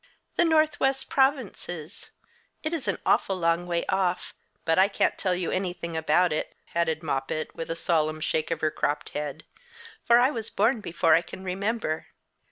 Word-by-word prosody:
"The - - +4
northwest 305 -4 +2
provinces. 220 - -1 0.5
It's 310 -6 -3
an 200 - 0
awful 195 - +3
long 170 0 +1
way 170 -1 0
off 185 -2 0 0.3
but 165 +2 +3
I 190 - +7
can't 200 - +1
tell 185 -2 0
you 180 -1 -2
anything 175 -3 -3
about 160 +1 +3
it," 155 - -3 0.2
added 160 -1 0
Moppet, 145 +1 -2
with 165 - -6
a 165 - -1
solemn 155 -2 0
shake 155 0 -1
of 165 -2 -2
her 155 -1 +2
cropped 145 0 -1
head, 150 0 -5 0.6
"for 235 - +6
I 250 +3 +5
was 225 -5 -5
born 235 -1 +2
before 165 -3 +2
I 165 - +6
can 185 - -10
remember. 190 -3 -2
175 Hz, 170 wpm, -27 LUFS, 160-220 Hz, 0.6 s, I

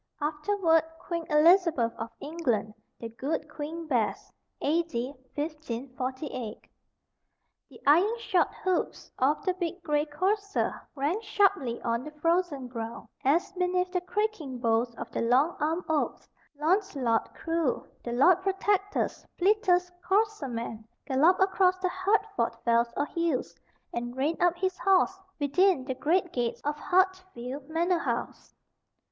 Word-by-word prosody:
(Afterward 325 +3 +2 0.2
Queen 335 -1 -4
Elizabeth 315 -6 +4
of 225 +1 -5
England; 250 -10 -1 0.3
the 230 - -6
"Good 265 +7 -3
Queen 320 +3 -6
Bess.") 240 -8 -1 0.3
A.D. 285 -5 0 0.2
1548. 260 -4 -4 1.1
The - - -15
iron 365 +11 +5
shod 375 -6 +2 0.2
hoofs 370 -2 -1
of 285 +7 +2
the 370 - +2
big 355 -1 -4
gray 295 -1 +1
courser 395 +7 0 0.2
rang 300 +10 0
sharply 395 - +1
on 235 +1 0
the 300 - -7
frozen 330 -3 0
ground, 230 -2 -6
as, 320 +8 +2
beneath 360 0 0
the 360 -1 0
creaking 410 - -2
boughs 235 0 +1
of 230 - -7
the - - -2
long 260 +8 +3
armed 320 +4 0
oaks, 315 -2 -1 0.3
Launcelot 300 - +1
Crue, 330 -5 -1 0.2
the 240 - -4
Lord 345 +9 +5
Protector's 390 +1 0
fleetest 360 -2 +3
courser 410 -3 +1
man, 230 -2 -5 0.2
galloped 310 +8 +4
across 375 -1 +3
the 370 0 -1
Hertford 375 +3 0
fells 235 0 +3
or 285 - +1
hills, 330 -4 -1 0.4
and 240 +1 -4
reined 305 +6 0
up 350 -1 +4
his 375 +1 -1
horse 380 0 +3 0.2
within 290 0 +3
the 260 - -2
great 345 +6 +1
gates 240 -2 -1
of 295 +1 -1
Hatfield 360 -9 0
manor 340 +2 +1
house. - - -3
320 Hz, 130 wpm, -28 LUFS, 260-370 Hz, 1.1 s, iron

